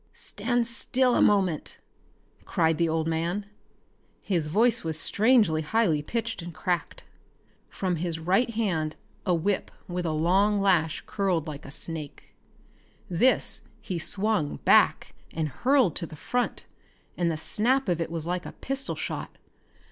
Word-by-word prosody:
"Stand 240 +3 -1
still 250 +2 +1
a - - +3
moment!" 190 -7 +2 0.7
cried 160 -2 +1
the 170 -1 +2
old 160 0 0
man. 170 +5 -1 0.8
His 170 -6 0
voice 225 +8 +2
was 160 -1 -2
strangely 215 -8 +3
high 165 -2 +1
pitched 230 +6 -3
and 170 +1 -7
cracked. 175 -1 -2 0.7
From 185 -3 -2
his 165 0 -2
right 190 +9 +2
hand 185 -9 -1 0.3
a 180 - +4
whip 190 +4 -1 0.2
with 180 -1 -3
a - - 0
long 190 +7 +2
lash 175 -5 +2
uncurled 185 -6 -1
like 150 -2 -7
a - - -9
snake. 155 -1 -6 0.8
This 240 +8 +2 0.2
he 190 -5 -4
swung 195 -3 0
back - - +4 0.2
and 160 -2 -1
hurled 250 - +2
to 170 - -3
the 155 - -10
front, 245 +10 -2 0.5
and 175 -1 +1
the 160 - -1
snap 245 - +1
of 175 -2 0
it 165 - -2
was 165 -2 -3
like 180 +1 -2
a - - -8
pistol 270 0 -3
shot. - - -5
180 Hz, 150 wpm, -27 LUFS, 160-215 Hz, 0.8 s, a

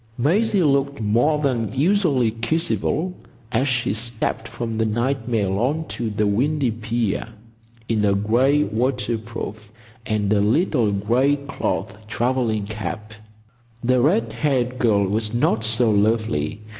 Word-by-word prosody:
Maisie 195 - +2
looked 140 -1 +1
more 120 +8 +2
than 125 -7 -1
usually 145 - +2
kissable 160 +7 -1 0.4
as 130 +3 +1
she 120 -5 0
stepped 110 0 -2
from 115 0 -5
the 110 0 0
night 120 +2 -1
mail 100 -5 0
on 150 +7 0
to 115 -2 -3
the 105 0 0
windy 130 +5 +1
pier, 115 -1 -2 0.6
in 110 -2 0
a 100 -1 +3
gray 125 +8 +3
waterproof 115 -3 -3 0.4
and 105 -1 +1
a 100 - +3
little 120 - +2
gray 120 +8 +2
cloth 125 - -3
travelling 115 -1 0
cap. 110 0 -6 0.7
The 125 +1 +3
red 115 -5 +2
haired 125 -1 0
girl 105 -5 +3
was 110 +3 -2
not 110 -2 +1
so 115 +1 +2
lovely. 105 -4 0
115 Hz, 130 wpm, -22 LUFS, 110-135 Hz, 0.7 s, a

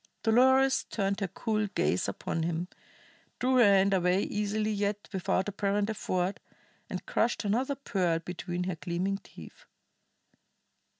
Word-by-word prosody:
Dolores 260 +4 +4
turned 200 -1 -1
her 195 - -1
cool 215 +3 -1
gaze 95 - 0
upon 100 - -3
him, 170 +1 -2 0.7
drew 255 +1 +2
her 245 - +7
hand 200 -1 +5
away 180 +1 +2
easily 210 +1 -1
yet 205 0 -2
without 190 0 0
apparent 205 +1 0
effort, 185 -2 -2 0.5
and - - -5
crushed 240 - 0
another 250 +7 0
pearl 185 -11 0
between 175 +1 -4
her 180 -1 -2
gleaming 185 +4 -2
teeth. - - -14
200 Hz, 130 wpm, -29 LUFS, 180-220 Hz, 0.7 s, her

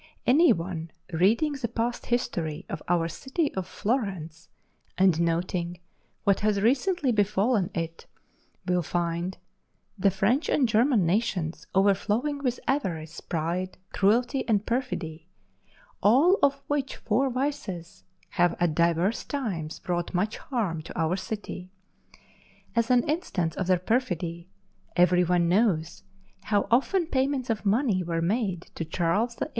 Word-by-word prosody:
Any 310 +7 +6
one 165 -1 -2 0.2
reading 220 - +3
the 260 -4 -3
past 235 +1 -3
history 170 -11 -2
of - - -4
our 170 -1 +2
city 270 - -2
of 190 -2 -3
Florence, 190 - -3 0.5
and 185 -3 +4
noting 170 +1 -1 0.4
what 200 -2 +3
has 210 -1 +1
recently 275 - +2
befallen 205 -1 +2
it, 165 0 -4 0.6
will 180 0 +2
find 175 +2 -2 0.6
the 195 +1 +4
French 195 - +1
and 270 -4 +3
German 225 -2 +3
nations 170 -4 -1
overflowing 210 +9 +2
with 250 -3 -1
avarice, 170 - -2
pride, 170 +3 -3 0.2
cruelty, 240 +7 +2
and 210 -1 +2
perfidy, 180 -10 -3 0.7
all 280 - +5
of 280 0 +2
which 280 -1 -1
four 255 +5 +1
vices 235 - -4 0.3
have 175 -1 +2
at 175 -3 +2
divers 170 +6 +1
times 195 - -4
wrought 175 0 -1
much 205 +5 0
harm 205 - -2
to 160 - -8
our 165 +2 +1
city. 190 -2 -6 1.1
As 230 +1 +2
an 250 -1 +3
instance 210 - -1
of 185 - -2
their 185 -1 +4
perfidy, 175 -5 -2 0.5
every 180 0 +5
one 175 -1 +2
knows 170 - +1 0.4
how 205 -2 +1
often 335 +9 +3
payments 265 -4 0
of 215 -2 -2
money 215 -2 +2
were 170 -1 -2
made 190 -2 0
to - - -4
Charles 180 +8 0
VIII. - - -3
195 Hz, 135 wpm, -27 LUFS, 170-245 Hz, 1.1 s, Any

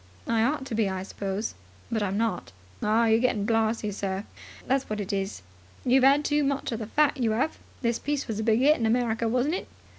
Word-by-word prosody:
"I 230 -1 +1
ought 270 +2 0
to 270 - -6
be, 220 -2 +1
I 190 -1 -3
suppose. 200 +2 -4 0.4
But 220 -2 0
I'm 200 -1 -1
not." 225 -4 -1 0.3
"Ah, 220 +2 +3
you're 225 0 +4
getting 230 -4 +1
blarzy, 225 -1 +1
sir, 195 0 -3 0.4
that's 270 +1 0
what 215 0 -2
it 205 +1 -3
is. 195 - -3 0.4
You've 255 +1 +4
'ad 280 +2 +5
too 295 0 +2
much 275 -1 -1
of 230 - -3
the 220 - -5
fat, 300 +4 +2
you 225 -4 +1
'ave. 265 +7 0 0.3
This 235 0 +1
piece 290 0 -2
was 220 -2 -3
a - - -1
big 225 +2 +3
'it 300 +2 +6
in 225 - +1
America, 230 -1 +1
wasn't 255 +6 +1
it?" 370 - -3
230 Hz, 220 wpm, -27 LUFS, 210-265 Hz, 0.4 s, it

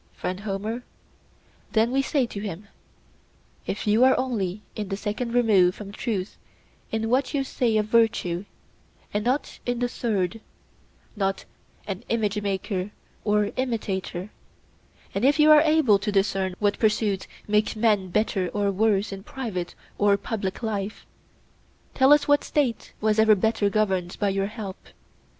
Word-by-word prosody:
'Friend 185 +1 -4
Homer,' 215 +4 -4 0.9
then 225 +2 +3
we 270 +1 +2
say 270 -1 +1
to 210 - -7
him, 200 -1 -6 1.0
'if 200 - -3
you 215 +3 +4
are 260 0 +5
only 210 -6 -2
in 210 -3 -4
the 195 - -2
second 220 +3 -3
remove 210 -7 +4
from 205 -2 -8
truth 205 -3 -4 0.5
in 225 0 -1
what 260 +5 +1
you 275 - +1
say 245 -4 0
of 210 - +1
virtue, 215 -5 +1 0.7
and 205 0 0
not 255 +5 -1
in 245 0 -1
the 245 +1 0
third—not 200 -2 -4 0.4
an 195 +2 -5
image 210 -2 0
maker 195 -1 -2 0.3
or 210 -1 +2
imitator—and 205 -3 -5
if 285 +4 +4
you 305 0 +7
are 300 -1 +9
able 305 -10 +4
to 210 +1 -2
discern 195 -2 0
what 205 -1 0
pursuits 210 -3 +1 0.2
make 210 +1 +1
men 215 -4 +2
better 195 -1 0
or 205 -1 +1
worse 205 0 +1
in 195 0 -6
private 200 -7 -5 0.2
or 205 -1 +4
public 200 0 -4
life, 210 -2 -3 0.9
tell 265 +1 +4
us 295 -1 +5
what 290 0 +4
State 270 -6 -1
was 215 0 +2
ever 220 -1 +6
better 205 0 +1
governed 190 -4 0
by 205 - +2
your 195 0 0
help? 210 -3 -7
210 Hz, 145 wpm, -25 LUFS, 195-235 Hz, 1.0 s, are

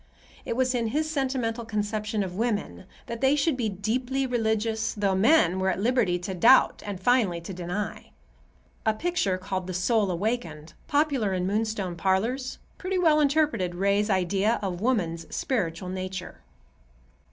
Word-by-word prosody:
It - - -2
was 255 0 +1
in 235 -2 0
his 305 +7 0
sentimental 255 -5 -1
conception 210 -1 -2
of 185 -2 -5
women 210 -2 -2 0.2
that 235 0 -6
they 270 +2 +4
should 295 0 +1
be 235 -4 -1
deeply 245 +7 -1
religious, 220 -2 0
though 200 -2 +1
men 190 - +4
were 190 0 +1
at 185 - -1
liberty 220 -5 +2
to 180 +2 -5
doubt 230 +9 +5
and 200 -3 -4
finally 205 -5 +2
to 180 +3 -7
deny. 180 +4 -4 0.7
A 220 -1 +2
picture 300 - 0
called 185 -1 -4
"The 185 - -4
Soul 205 +2 +2
Awakened," 170 -5 -3
popular 285 -9 +1
in 180 -1 -1
Moonstone 205 -2 -1
parlors, 220 +9 0 0.2
pretty 370 0 -2
well 320 -4 +4
interpreted 280 - +1
Ray's 200 +3 +1
idea 195 +4 +1
of 180 -2 -3
woman's 170 -9 0
spiritual 180 -7 -2
nature. 185 0 -5
215 Hz, 150 wpm, -26 LUFS, 185-250 Hz, 0.7 s, doubt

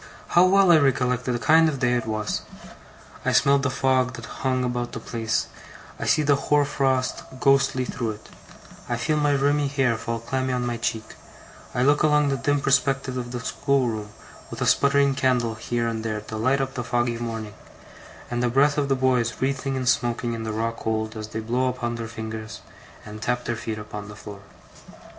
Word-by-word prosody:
How 175 +1 +6
well 195 -1 +5
I 160 - +7
recollect 125 -3 +1
the 125 -2 0
kind 160 +5 +5
of 145 - -3
day 125 -1 +1
it 120 -2 -1
was! 110 -1 -2 0.8
I - - +1
smell 140 0 +4
the 140 +1 0
fog 130 -1 +1
that - - -8 0.2
hung 130 -1 +1
about 120 -1 -2
the - - -4
place; 115 -1 -2 0.5
I - - -3
see 155 - +3
the 145 -1 +4
hoar 145 +1 +2
frost, 135 -2 0 0.2
ghostly, 135 -2 +3
through 115 -3 -3
it; 105 - -15 0.6
I 120 - 0
feel 155 +6 0
my 145 -1 +2
rimy 145 +1 +2
hair 135 -4 +1
fall 115 +1 -3
clammy 130 +3 -2
on 125 -1 -1
my 120 -1 -2
cheek; 110 -1 -2 0.7
I 125 - +2
look 145 +2 +4
along 150 -1 +3
the 135 - 0
dim 145 +3 0
perspective 135 -1 +1
of 120 -1 -4
the 125 -1 -4
schoolroom, 120 -6 -1 0.4
with - - -7
a - - 0
sputtering 140 0 +3
candle 125 -4 +1
here 115 +2 -2
and 115 -1 -3
there 110 -2 -3
to 110 +1 -8
light 130 +5 +1
up 135 0 -3
the 125 - -3
foggy 120 0 0
morning, 115 -3 -5 0.8
and 120 0 -1
the 125 - +2
breath 145 +4 +3
of 140 -1 -1
the 135 - +3
boys 130 -3 +1
wreathing 135 0 -1
and 130 -1 -3
smoking 120 -1 +1
in 115 - -4
the 110 -1 -3
raw 115 +2 -1
cold 110 -1 -3
as 110 -1 -6
they 110 +1 -5
blow 125 +4 0
upon 120 -2 -2
their 115 -1 -5
fingers, 110 -1 -7 0.4
and 105 0 -9
tap 125 +2 -1
their 120 - -1
feet 110 -1 -5
upon 105 -1 -7
the 105 - -10
floor. 105 -1 -10
125 Hz, 200 wpm, -24 LUFS, 115-135 Hz, 0.8 s, I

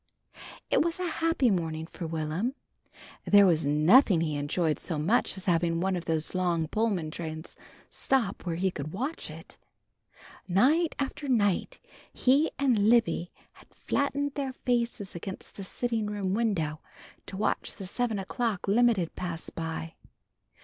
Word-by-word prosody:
It - - +4
was 335 +2 -1
a 365 - -1
happy 325 -7 +1
morning 160 -3 -2
for 165 0 -7
Will'm. 165 - -2 0.7
There 205 -1 +6
was 165 -5 +3
nothing 165 - +5
he 155 -3 -1
enjoyed 150 +2 0
so 165 - -3
much 195 +8 +1
as 190 - -4
having 170 -2 +2
one 190 +2 0
of 175 -1 -4
these 160 -1 -1
long 175 -3 0
Pullman 195 -6 -1
trains 160 0 -6 0.4
stop 240 -7 0
where 170 -2 -2
he 190 +2 0
could 155 -2 -6
watch 265 - -3
it. - - -12 0.9
Night 295 - +3
after 280 +1 -3
night 225 - +1 0.3
he 275 +5 +3
and 240 -7 +3
Libby 225 -7 +2 0.2
had - - -20
flattened 280 0 -1
their 275 -2 -3
faces 235 -5 -1
against 190 +2 -7
the 200 - -7
sitting 225 +2 -2
room 200 -2 -2
window 180 -9 0 0.5
to 190 - -7
watch 210 - -1
the 195 - -8
seven 225 +3 -1
o'clock 205 +1 -2
limited 215 -5 +3
pass 170 -2 -5
by. 165 0 -5
195 Hz, 150 wpm, -28 LUFS, 165-240 Hz, 0.9 s, There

